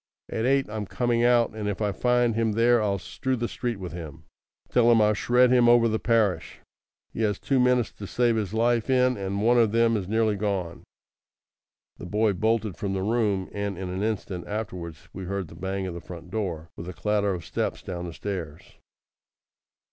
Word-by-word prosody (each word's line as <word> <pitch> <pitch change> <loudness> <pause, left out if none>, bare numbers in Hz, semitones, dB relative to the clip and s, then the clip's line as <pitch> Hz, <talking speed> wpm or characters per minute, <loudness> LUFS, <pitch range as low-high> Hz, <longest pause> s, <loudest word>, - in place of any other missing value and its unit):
At 110 +2 -1
eight 135 0 +2
I'm 105 -1 -5
coming 120 +1 0
out, 120 -1 +4
and 110 -1 -4
if 100 - -3
I 105 -2 0
find 120 +2 +2
him 110 -1 0
there 115 +1 +4
I'll 100 -2 0
strew 130 +7 -3
the 120 -1 -2
street 120 -2 -3
with 90 -3 -6
him. 80 -2 -8 0.4
Tell 120 -1 +4
him 115 - +5
I'll 105 0 +4
shred 125 +4 +3
him 120 -2 +5
over 120 -1 +6
the 110 -1 0
parish. 110 -5 +1 0.6
He - - -4
has 105 -3 +1
two 135 -2 0
minutes 125 -2 +3
to 100 - -9
save 120 +1 +2
his 105 -4 -2
life 115 +2 +1
in, 125 -1 +3
and 100 +1 -3
one 120 +2 +4
of 115 -3 +3
them 115 0 +3
is 100 -4 -2
nearly 110 0 +1
gone." 95 -5 -3 1.1
The 90 - -8
boy 105 +2 +2
bolted 110 0 0
from 100 -1 -3
the 95 -1 -2
room, 105 -3 0
and 100 -2 -3
in 95 -1 -5
an 95 +2 -3
instant 100 -4 -3
afterwards 90 -7 -6
we 95 0 -6
heard 95 -2 -3
the - - -12
bang 95 +2 -3
of 90 - -4
the 85 - -7
front 90 0 -10
door, 85 -7 -3
with 85 +2 -7
a - - -6
clatter 100 +2 0
of 85 -3 -8
steps - - -3
down 90 -1 -5
the 85 - -7
stairs. 85 -6 -5
105 Hz, 205 wpm, -26 LUFS, 95-115 Hz, 1.1 s, over